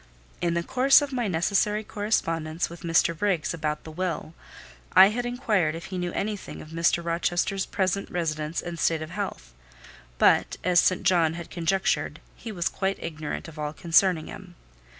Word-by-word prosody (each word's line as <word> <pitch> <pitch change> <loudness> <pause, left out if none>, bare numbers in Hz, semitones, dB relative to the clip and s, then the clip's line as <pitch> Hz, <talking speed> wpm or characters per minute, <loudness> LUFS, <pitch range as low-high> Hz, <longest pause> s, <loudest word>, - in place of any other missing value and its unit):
In 170 -1 0
the 170 - 0
course 265 - +5
of 285 -1 -5
my 245 -3 0
necessary 200 +4 +1
correspondence 165 -7 -1
with 170 - -10
Mr. 170 0 +2
Briggs 175 -4 0
about 150 -2 -3
the 160 - -9
will, 165 -1 -3 0.6
I 195 - +9
had 240 +3 -2
inquired 215 -10 0
if 165 - -7
he 185 - -2
knew 175 0 -2
anything 210 -1 -4
of 155 - -11
Mr. 165 +1 +1
Rochester's 175 +3 0
present 195 0 -1
residence 155 -2 -2
and 170 -1 -6
state 160 -1 +1
of 155 - -9
health; - - -5 0.6
but, - - +3
as 180 -1 +4
St. 185 +2 +2
John 165 -3 +3
had 170 0 -8
conjectured, 190 +3 0 0.2
he 230 - -8
was 175 -5 -1
quite 195 0 -1
ignorant 155 -1 -5
of 160 -1 -11
all 150 0 -3
concerning 170 0 +3
him. 185 -3 -11
175 Hz, 170 wpm, -26 LUFS, 165-195 Hz, 0.6 s, I